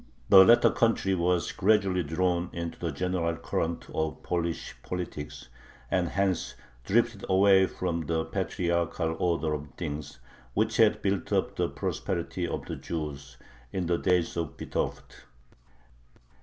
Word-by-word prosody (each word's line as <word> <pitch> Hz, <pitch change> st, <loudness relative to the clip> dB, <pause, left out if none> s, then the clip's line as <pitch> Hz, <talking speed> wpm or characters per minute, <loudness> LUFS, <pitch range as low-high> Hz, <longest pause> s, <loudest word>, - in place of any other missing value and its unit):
The 95 Hz, -1 st, +10 dB
latter 115 Hz, +5 st, +6 dB
country 115 Hz, -4 st, +2 dB
was 90 Hz, -1 st, +1 dB
gradually 95 Hz, -2 st, +2 dB
drawn 85 Hz, +2 st, 0 dB
into 85 Hz, -1 st, -5 dB
the 85 Hz, -, -2 dB
general 85 Hz, +2 st, -1 dB
current 85 Hz, 0 st, -2 dB
of 80 Hz, -1 st, -2 dB
Polish 85 Hz, -1 st, -2 dB
politics, 75 Hz, -7 st, -6 dB, 0.4 s
and 90 Hz, -2 st, +2 dB
hence 95 Hz, -1 st, 0 dB, 0.3 s
drifted 115 Hz, -, +1 dB
away 95 Hz, 0 st, +5 dB
from 85 Hz, -5 st, -3 dB
the 80 Hz, -1 st, 0 dB
patriarchal 85 Hz, -1 st, -1 dB
order 80 Hz, -3 st, +1 dB
of 75 Hz, -1 st, -4 dB
things, 75 Hz, -3 st, -5 dB, 0.4 s
which -, -, +1 dB
had -, -, +4 dB
built 100 Hz, -2 st, -1 dB
up -, -, +1 dB
the -, -, 0 dB
prosperity -, -, -3 dB
of -, -, -4 dB
the -, -, -5 dB
Jews 70 Hz, -5 st, -6 dB, 0.3 s
in 95 Hz, -, -2 dB
the 85 Hz, 0 st, +1 dB
days 90 Hz, -2 st, +1 dB
of 80 Hz, -5 st, -3 dB
Vitovt. -, -, -4 dB
85 Hz, 135 wpm, -28 LUFS, 80-95 Hz, 0.4 s, The